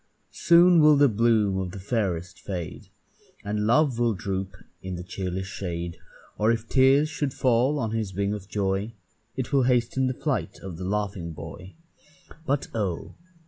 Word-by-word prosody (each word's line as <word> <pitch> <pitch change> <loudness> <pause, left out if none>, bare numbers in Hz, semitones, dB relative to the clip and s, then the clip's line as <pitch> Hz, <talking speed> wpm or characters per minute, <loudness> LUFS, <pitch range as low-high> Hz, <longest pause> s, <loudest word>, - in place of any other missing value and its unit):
Soon 175 0 +6
will 150 -1 +6
the 145 0 +6
bloom 110 -4 +2
of 95 -1 -3
the 100 - -7
fairest 95 -4 -2
fade, 90 -5 -6 0.6
And 105 +1 -1
love 130 0 +3
will 120 -3 +2
droop 95 0 -4 0.3
in 95 -1 -5
the 90 - -6
cheerless 95 0 -4
shade, 85 -3 -5 0.4
Or 110 +2 +4
if 115 0 -2
tears 135 +4 +4
should 150 -3 -3
fall 130 +3 +2
on 115 -6 -2
his 110 -5 -3
wing 100 +1 0
of 100 -2 -7
joy, 100 +2 -1 0.4
It 130 +2 -4
will 140 - +5
hasten 125 +1 +2
the 130 - -2
flight - - -2
of 95 -4 -7
the 90 - -5
laughing 100 -4 -2
boy. 90 +5 -10 0.7
But 140 +1 0
oh! 100 -7 -3
105 Hz, 165 wpm, -26 LUFS, 95-125 Hz, 0.7 s, Soon